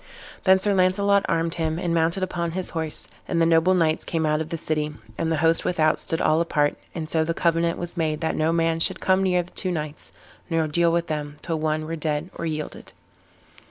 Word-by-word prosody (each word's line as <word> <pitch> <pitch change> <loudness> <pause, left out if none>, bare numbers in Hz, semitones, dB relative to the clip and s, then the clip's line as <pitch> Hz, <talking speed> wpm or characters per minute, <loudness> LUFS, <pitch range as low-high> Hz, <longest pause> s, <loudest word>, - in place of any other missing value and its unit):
Then 190 0 +7
Sir 200 +2 +1
Launcelot 200 +2 +3
armed 165 0 +1
him 160 0 0
and 175 -1 -1
mounted 170 +3 +1
upon 170 -2 -2
his 185 0 -3
horse, 160 -2 -4 0.2
and 170 - 0
the 165 - +4
noble 165 +3 +4
knights 160 -3 +2
came 160 -2 -1
out 150 0 +1
of 160 - -5
the 165 - -3
city, 150 -1 -2 0.2
and 165 +6 -1
the 160 - +1
host 165 0 +3
without 155 -3 +2
stood 165 - -1
all 155 +2 +3
apart; 145 -3 +1 0.2
and 160 -2 -4
so 160 0 +1
the 165 +1 -2
covenant 170 0 +1
was 175 0 -4
made 155 -3 -1
that 160 - 0
no 155 +1 +1
man 165 -1 +1
should 185 +3 +1
come 190 0 +2
near 180 -2 +2
the 175 - -17
two 185 - -2
knights, 155 -3 -4 0.4
nor 165 -2 +1
deal 170 +2 +2
with 170 0 +1
them, 150 -2 -4
till 165 -3 -2
one 155 0 -1
were 165 +1 -3
dead 155 +2 -2
or 165 - -3
yielded. 155 -1 -5
165 Hz, 225 wpm, -24 LUFS, 155-175 Hz, 0.4 s, Then